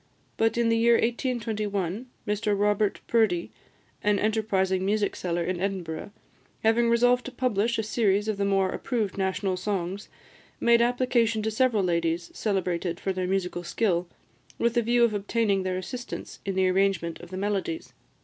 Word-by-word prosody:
But 225 +1 +1
in 235 -1 +2
the 230 - +3
year 235 0 +5
1821, 225 -4 -1 0.2
Mr 210 -1 0
Robert 205 0 +1
Purdie, 215 -7 +1 0.5
an 210 0 +3
enterprising 200 -4 +1
music 205 +1 0
seller 175 -1 -2
in 180 +1 -2
Edinburgh, 185 -4 -3 0.5
having 230 +1 +3
resolved 245 +1 +4
to 260 - -5
publish 235 -3 0
a 220 - 0
series 210 -2 +1
of 215 -2 -1
the 200 - 0
more 195 -1 +2
approved 220 -7 -2
national 190 0 -1
songs, 195 0 -3 0.5
made 235 0 +4
application 235 -2 +2
to 220 - 0
several 220 -2 +2
ladies 170 -1 0
celebrated 180 -4 -1
for 190 - -1
their 185 -1 -2
musical 180 -2 -1
skill, 180 -2 0 0.5
with 235 0 +1
the 240 - +3
view 240 +1 +3
of 235 -2 +3
obtaining 205 -1 +1
their 185 -1 -2
assistance 245 +7 -6
in 195 - -1
the 190 0 +3
arrangement 185 -3 +1
of 175 - -11
the 185 - -6
melodies. 205 - -2
205 Hz, 160 wpm, -27 LUFS, 185-230 Hz, 0.5 s, year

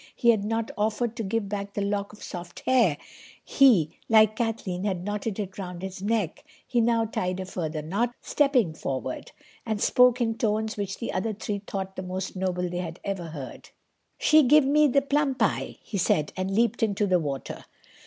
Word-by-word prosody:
He 235 - +5
had 215 -3 0
not 225 +1 -2
offered 220 +2 0
to - - -2
give 205 +1 -1
back 200 0 -5
the 205 - 0
lock 200 0 -2
of 210 - -13
soft 175 -1 -8
hair. 235 - +3 0.5
He, 215 - +4 0.2
like 215 -1 +6
Kathleen, 220 -6 -2
had 190 -4 -1
knotted 205 +1 -3
it 200 -2 -5
round 180 -1 -6
his 190 -1 -6
neck; 205 - -1 0.2
he 240 -2 +1
now 230 0 +2
tied 185 -4 -2
a 190 - -4
further 160 -4 -4
knot, 230 +9 -1
stepped 250 - +1
forward, 130 -1 -4 0.3
and 220 -2 -2
spoke 250 +3 +4
in 225 -2 -1
tones 220 0 0
which 200 -2 -4
the 230 - -4
other 205 +4 -1
three 205 0 -4
thought 190 -1 -4
the - - -4
most 185 +1 -5
noble 180 -1 -1
they 175 0 -4
had 170 -1 -5
ever 195 -3 -3
heard. 145 -5 -8 0.5
"She 310 0 +5
give 295 +1 +5
me 300 +2 +5
the 275 +1 +2
plum 280 -1 +1
pie," 225 -5 -1
he 200 - -4
said, 155 -4 +1
and 185 0 -2
leaped 230 +4 +1
into 210 -2 +1
the 185 -2 +3
water. 140 -4 -5
205 Hz, 195 wpm, -26 LUFS, 185-230 Hz, 0.5 s, like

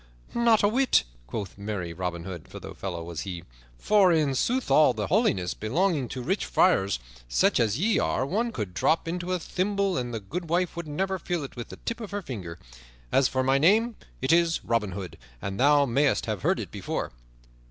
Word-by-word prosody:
"Not 235 -3 +4
a - - +6
whit," 255 +5 +3 0.2
quoth 100 -3 -6
merry 100 -5 -4
Robin 85 -1 -4
Hood, 90 -3 -7
for - - -9
the - - -9
fellow 85 -4 -5
was 85 -1 -5
he, 90 -4 -6 0.3
"for 200 - +4
in 155 -4 +2
sooth 250 - 0
all 155 - +6
the - - -2
holiness 150 - +1
belonging 145 - 0
to 125 - -5
rich 190 +9 0
friars, 100 - +3 0.3
such - - +3
as 110 -1 +2
ye 210 +7 +2
are, 130 - 0
one 225 - -1
could 105 - -4
drop 160 - +1
into 175 +2 -3
a 185 - +2
thimble 195 +1 -1
and 120 -1 -4
the 115 - -3
goodwife 170 - -2
would 170 -2 -5
never 190 +5 -2
feel 175 -2 -2
it 135 - -8
with 120 -2 -7
the - - -9
tip 230 +1 -3
of 215 - -6
her 205 0 -4
finger. 95 - -6 0.5
As 135 - +4
for 130 0 0
my 135 +1 +3
name, 220 +9 +4 0.3
it 130 - +3
is 170 -1 +2
Robin 110 -5 0
Hood, 90 -5 -7 0.2
and 100 +5 -5
thou 145 +1 +5
mayst 140 +3 +2
have 105 -5 -3
heard - - +1
it - - -6
before." - - -4
140 Hz, 205 wpm, -27 LUFS, -, 0.5 s, a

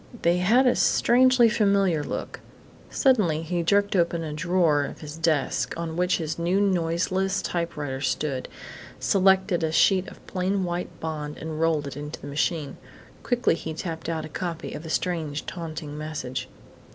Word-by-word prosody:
They 170 +1 +4
had 225 +9 +4
a 250 - +4
strangely 255 0 +4
familiar 200 -7 +2
look.... - - -5 0.5
Suddenly 200 - +2
he 175 +1 -1
jerked 200 +4 +2
open 170 -2 +1
a 155 -2 -4
drawer 165 -2 +2
of - - -7
his 150 -1 -7
desk, 160 -4 0
on 165 -1 -4
which 180 +1 +2
his 160 -1 -4
new 175 +3 +1
noiseless 190 +1 +1
typewriter 150 -6 -3
stood, 140 -3 -1 0.5
selected 190 -2 +3
a 160 - 0
sheet 180 +3 +3
of - - -13
plain 190 +1 -1
white 175 0 -3
bond, 150 -2 -4
and 160 0 -5
rolled 160 -3 +2
it 140 - -6
into 145 +1 -6
the - - -10
machine. 145 +1 -2 0.4
Quickly 245 -6 +1
he 160 -1 -5
tapped 165 -1 -5
out 160 -2 -2
a - - -9
copy 170 +1 -4
of 150 - -6
the 160 - -9
strange, 160 -4 -2
taunting 160 -4 -6
message. 140 -4 -5
165 Hz, 165 wpm, -25 LUFS, 155-185 Hz, 0.5 s, They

